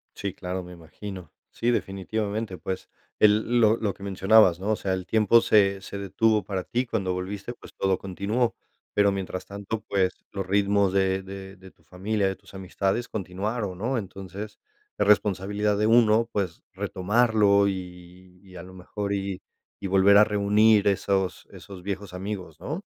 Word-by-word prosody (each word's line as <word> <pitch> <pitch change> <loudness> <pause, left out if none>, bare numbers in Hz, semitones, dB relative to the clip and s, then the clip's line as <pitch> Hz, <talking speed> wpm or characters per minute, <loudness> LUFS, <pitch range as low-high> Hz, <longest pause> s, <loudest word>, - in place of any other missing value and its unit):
Sí, 100 -2 -4
claro, 90 -1 -5
me 90 - -11
imagino. 90 +1 -9 0.2
Sí, 120 +1 0
definitivamente, 100 0 -3
pues, 95 +3 -5 0.3
el 110 +3 +4
lo 110 0 +4
lo 105 -3 -1
que 100 - -14
mencionabas, 95 -2 +4
¿no? 100 +3 -1
O - - +2
sea, 95 -2 -2
el 95 -1 -3
tiempo 110 +1 +4
se 100 -2 +3
se 100 - -7
detuvo 105 +2 +1
para 95 -1 -3
ti. 125 +2 -1
Cuando 95 -6 -2
volviste, 100 +5 -5
pues, - - -15
todo 95 -1 0
continuó, 100 +6 -1 0.4
pero 100 -1 +4
mientras 95 -1 -4
tanto, 100 +2 -5
pues, 95 -2 0
los 95 -1 -4
ritmos 100 0 +2
de 95 0 +1
de 95 0 -9
de 95 0 -15
tu - - -32
familia, 100 +2 -1
de 95 - -2
tus - - -19
amistades 95 +4 -2
continuaron, 100 0 -4
¿no? 125 +5 -1
Entonces, 95 0 -7 0.4
es 105 - +1
responsabilidad 105 0 +2
de 105 - +2
uno, 115 0 +4
pues, 95 -5 -3
retomarlo, 100 +1 +2
y 90 -1 -8
y, 95 -2 -16
a 85 - -8
lo 95 - -12
mejor, 100 +2 -4
y 95 -1 -3 0.4
y 100 - -4
volver 95 +1 +5
a 105 - +8
reunir 105 0 +3
esos 95 -1 0
esos 95 -2 -11
viejos 100 -1 -5
amigos, 90 -4 -6
¿no? 160 +6 -5
100 Hz, 170 wpm, -26 LUFS, 95-105 Hz, 0.4 s, a